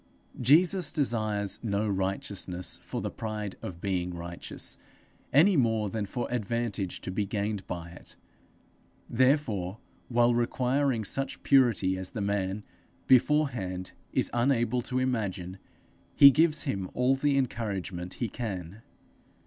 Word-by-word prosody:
Jesus 170 - +4
desires 110 - 0
no 105 -1 -1
righteousness 95 -2 -2
for - - -5
the - - -3
pride 105 -3 -5
of 85 -2 -7
being 90 -3 -1
righteous, 85 0 -5 0.5
any 175 +8 +5
more 110 - +1
than 105 -2 -2
for 120 +4 -3
advantage 115 -4 -2
to - - -5
be 105 +3 0
gained 100 -1 -2
by 85 -1 -5
it; 85 - -11 0.9
therefore, 115 -7 +1 0.3
while 120 0 +3
requiring 125 +1 +1
such 135 +7 -2
purity 115 -9 +3
as 95 - -3
the - - -6
man, 100 0 -1 0.4
beforehand, 125 -9 +2 0.2
is - - 0
unable 120 -1 +2
to 125 +2 -3
imagine, 100 -8 -2 0.6
he 140 -1 +10
gives 155 +2 +3
him 100 - -3
all 125 +2 +3
the 140 +1 +1
encouragement 100 -8 -3
he 120 - -2
can. 100 -3 -6
110 Hz, 125 wpm, -29 LUFS, 95-130 Hz, 0.9 s, he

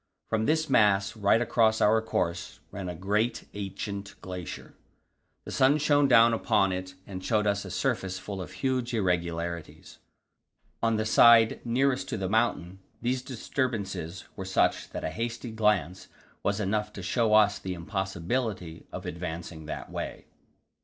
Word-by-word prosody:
From 110 0 0
this 160 +1 +2
mass, 105 -5 +3
right 105 +1 +3
across 110 -2 +2
our 110 +2 +4
course, 90 -5 -2
ran 95 -2 -5
a 90 - -5
great, 105 +6 0
ancient 100 0 -5
glacier; 90 -2 -7 0.7
the - - -7
sun 135 +3 +4
shone 145 -1 +3
down 115 -2 +6
upon 105 -4 +2
it 95 0 -5
and 95 -2 -7
showed 105 0 +1
us 100 -1 0
a - - -7
surface 95 -1 -1
full 95 0 -6
of 85 - -7
huge 130 -2 -1
irregularities. 85 -4 -2 0.8
On 115 0 +2
the 110 0 0
side 115 0 +6
nearest 130 +2 +1
to - - -2
the 95 -2 -2
mountain 95 -4 0 0.2
these 125 +2 -1
disturbances 105 - -3
were 95 - -5
such 95 0 +1
that - - -6
a 80 - -2
hasty 115 +3 -4
glance 105 -6 0 0.3
was 100 +1 0
enough 105 +1 -1
to 95 - -7
show 110 +3 +2
us 105 -1 +4
the 95 -1 -4
impossibility 95 0 -3
of - - -7
advancing 85 -2 -6
that - - -6
way. - - -5
105 Hz, 155 wpm, -28 LUFS, 95-115 Hz, 0.8 s, down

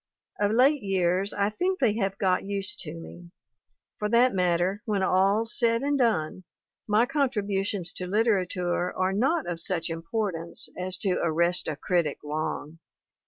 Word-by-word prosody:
Of 205 +1 +2
late 270 +5 +4
years, 190 0 +1
I 200 +1 0
think 365 - -1
they 240 - +2
have 195 -2 -1
got 185 -2 +1
used 200 0 -2
to 160 -2 -5
me; 170 +1 -11 0.7
for 210 - -1
that 240 +3 +4
matter, 180 +2 +1
when 205 -4 0
all's 200 +5 +2
said 230 +1 +2
and 285 +1 +1
done, 185 - 0 0.4
my 215 +2 +4
contributions 205 - -1
to 180 - -5
literature 180 -4 0
are 185 +1 +1
not 270 - +1
of 175 -1 -2
such 170 0 -2
importance 165 0 -3
as 185 0 -2
to 185 -1 0
arrest 170 +2 +1
a 155 - -2
critic 165 -1 0
long. 155 +1 -4
195 Hz, 155 wpm, -27 LUFS, 175-220 Hz, 0.7 s, late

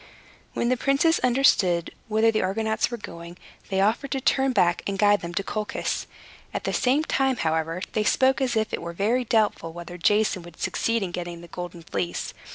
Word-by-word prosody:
When 235 - 0
the 255 - +2
princes 280 +6 +3
understood 220 -9 +3
whither 220 +1 +3
the 215 - 0
Argonauts 220 +3 0
were 240 - -4
going, 170 -4 -9 0.3
they 190 -1 +1
offered 225 +7 +1
to 270 - 0
turn 265 0 +2
back, 180 -7 +2
and 200 -1 -2
guide 205 0 +4
them 170 - -5
to 200 - 0
Colchis. 210 +1 -3 0.5
At - - -2
the - - -2
same 265 +5 +2
time, 270 -4 +1
however, 160 +2 -1
they 215 - +1
spoke 260 +4 +3
as 250 -3 0
if 220 0 0
it - - -2
were 170 - -6
very 220 +8 +1
doubtful 210 -8 +1
whether 175 +1 -8
Jason 205 +1 +2
would 170 0 -14
succeed 230 -2 0
in 180 - -3
getting 175 -1 -5
the 170 - -11
Golden 175 -1 -7
Fleece. 90 - -3
210 Hz, 195 wpm, -25 LUFS, 175-240 Hz, 0.5 s, guide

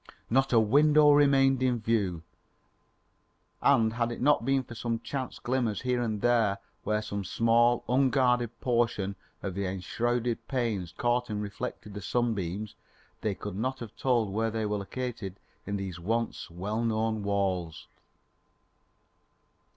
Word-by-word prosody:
Not 135 +3 +3
a 115 - +6
window 145 +6 +5
remained 135 -2 +4
in 125 -2 +2
view, 100 -7 0 1.4
and 115 -5 +4
had 120 0 -1
it 120 - -5
not 145 -3 +3
been 135 +1 +2
for 120 - -10
some 115 0 -2
chance 130 -1 -4
glimmers 120 -4 -1
here 125 -1 0
and 110 -3 -2
there 115 -5 +3 0.3
where 105 0 0
some 100 -1 -4
small, 115 +5 +3
unguarded 125 -2 +2
portion 115 -5 0 0.3
of 100 - -3
the 100 +1 -2
enshrouded 115 +5 -2
panes 115 -10 -1
caught 120 0 0
and 105 -1 -2
reflected 105 0 -5
the 105 - -6
sunbeams, 105 -3 -1 0.5
they 105 -3 -1
could 105 -1 -6
not 130 +6 -2
have 115 -5 -9
told 120 -6 +1
where 115 +2 +1
they 110 0 -2
were 105 0 -1
located 100 -2 -5 0.3
in 100 0 -1
these 95 -3 -5
once 115 +6 -2
well 100 +7 -3
known 110 -1 0
walls. 95 -5 -1
115 Hz, 145 wpm, -29 LUFS, 100-125 Hz, 1.4 s, a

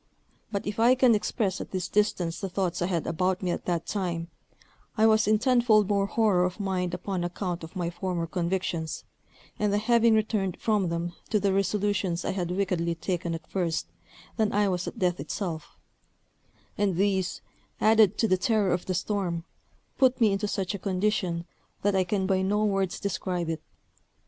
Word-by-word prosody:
But 200 -2 -2
if 205 +1 -4
I 240 +3 +6
can 255 -2 +5
express 205 -2 -1
at - - -7
this 185 -1 -3
distance 180 -5 0
the 195 - -3
thoughts 180 -2 -1
I 175 - +1
had 170 -4 -1
about 180 +3 0
me 180 - 0
at - - -4
that 170 -2 -1
time, 175 -4 -3 0.7
I 220 - +5
was 220 -1 +4
in 215 0 +4
tenfold 235 -4 +4
more 200 -1 +2
horror 205 -5 +2
of 180 +3 -2
mind 185 -3 -1
upon 185 -1 -3
account 175 0 -3
of 160 +4 -10
my 175 -2 -2
former 175 -1 -2
convictions, 170 -1 -2 0.6
and 210 -1 +1
the 205 - +2
having 230 +1 +4
returned 210 -4 0
from 210 -5 +1
them 170 +1 -3 0.2
to 215 - +2
the 195 -1 +1
resolutions 195 -2 0
I - - 0
had 180 -3 -2
wickedly 180 -3 0
taken 170 -1 -2
at 165 - -8
first, 170 -4 -1 0.5
than 220 -2 +2
I 205 0 +2
was 180 -1 -2
at - - -6
death 180 -1 0
itself; 170 -7 -5 1.0
and 200 -3 +2
these, 190 0 0 0.4
added 215 -2 +5
to 225 - +2
the 185 - +3
terror 210 -1 +2
of 175 - -3
the 185 - 0
storm, 180 -3 -1 0.6
put 260 -1 +4
me 220 -4 +4
into 195 +1 -1
such 195 -2 -2
a 200 - -4
condition, 185 -3 -1 0.4
that 200 0 +2
I 190 -1 +2
can 190 +1 0
by 190 -1 +2
no 205 +3 +1
words 195 -3 0
describe 180 -3 -2
it. 160 -1 -4
190 Hz, 185 wpm, -27 LUFS, 175-210 Hz, 1.0 s, I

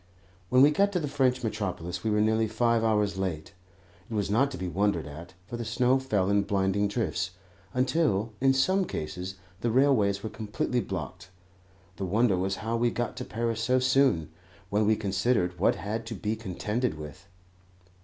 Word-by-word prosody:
When 125 +1 +6
we 145 - +7
got 200 +6 +2
to 180 - +1
the 150 - -2
French 130 -3 +1
metropolis 90 -5 -3
we 110 - 0
were 105 0 +2
nearly 110 +1 +2
five 115 +1 +1
hours 105 -3 +1
late. 90 -2 -3 0.6
It 115 - -4
was 100 -1 -1
not 130 +6 +3
to 135 - -7
be 90 - -4
wondered 95 -1 0
at, 80 +5 -10
for 120 - -6
the 120 - -3
snow 125 +3 +2
fell 105 -8 0
in 100 0 +3
blinding 100 0 +1
drifts, 105 -2 -1 0.4
until, 125 -5 +1
in 135 0 +5
some 190 +8 +2
cases, 90 - -5 0.2
the 120 - 0
railways 110 -6 +3
were 110 - -3
completely 110 +3 -2
blocked. 90 - -6 0.7
The 95 - -3
wonder 105 +2 +2
was 95 +2 -1
how 115 +1 0
we 120 +1 +2
got 120 0 -3
to - - -4
Paris 115 0 -2
so 125 +2 +2
soon, 130 - +2 0.4
when 105 +1 +2
we 110 - +4
considered 95 -3 0
what 95 - +3
had 110 +3 -4
to 115 - -5
be 105 +3 -2
contended 110 +1 -2
with. 75 +5 -10
110 Hz, 185 wpm, -28 LUFS, 95-120 Hz, 0.7 s, we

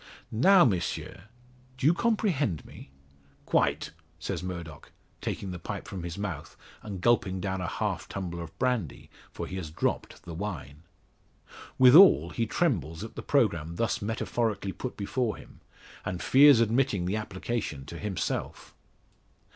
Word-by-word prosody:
Now, 175 - +6
Monsieur, 95 -2 -2 0.5
do 130 - -3
you 155 - +6
comprehend 175 - 0
me?" - - -12 0.6
"Quite," - - +1 0.3
says 85 +1 -4
Murdock, 85 -5 -7 0.3
taking 95 - -4
the 90 - -6
pipe - - -6
from 95 - -6
his 85 0 -6
mouth 95 -7 -5 0.2
and 100 -3 -6
gulping 95 -4 +2
down 95 0 -2
a 90 - -2
half - - -3
tumbler 85 -3 -5
of 80 -1 -10
brandy 125 - -2 0.2
for - - -5
he 95 - -6
has 85 -5 -5
dropped 75 - -2
the 85 - -8
wine. 80 -6 -6 1.0
Withal, 130 - +8
he 115 -1 -1
trembles 90 - 0
at 110 - -8
the - - -6
programme 85 0 +1
thus 115 +6 -1
metaphorically 110 -2 -1
put 125 +5 -6
before 110 +3 -1
him, - - -15 0.4
and 90 -1 -3
fears 140 +1 +7
admitting 115 -4 +1
the 95 +4 0
application 100 - -4
to 85 - -8
himself. 105 -4 -4
100 Hz, 145 wpm, -28 LUFS, 85-120 Hz, 1.0 s, Withal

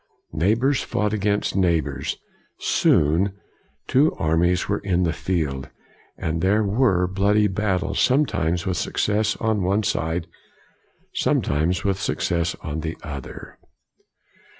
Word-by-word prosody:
Neighbors 110 - +2
fought 105 0 -1
against 105 0 0
neigh 90 -4 +3
bors. 70 -3 -4 0.4
Soon, 85 +7 +2 0.5
two 140 +4 +3
armies 85 +3 +1
were 100 0 0
in 90 -2 0
the 80 -3 +1
field, 80 -6 -2 0.5
and 80 +1 -2
there 100 +4 +3
were 100 -3 +2
bloody 100 +3 +2
battles, 95 -2 -1
sometimes 90 - +1
with 95 -2 -1
success 105 +6 0
on 110 -2 0
one 100 +4 +1
side, 80 -2 -1 0.9
sometimes 80 +5 0
with 100 -1 0
success 85 -3 -1
on 75 +1 -4
the 80 +1 -4
other. 70 -3 -8
90 Hz, 120 wpm, -23 LUFS, 80-105 Hz, 0.9 s, neigh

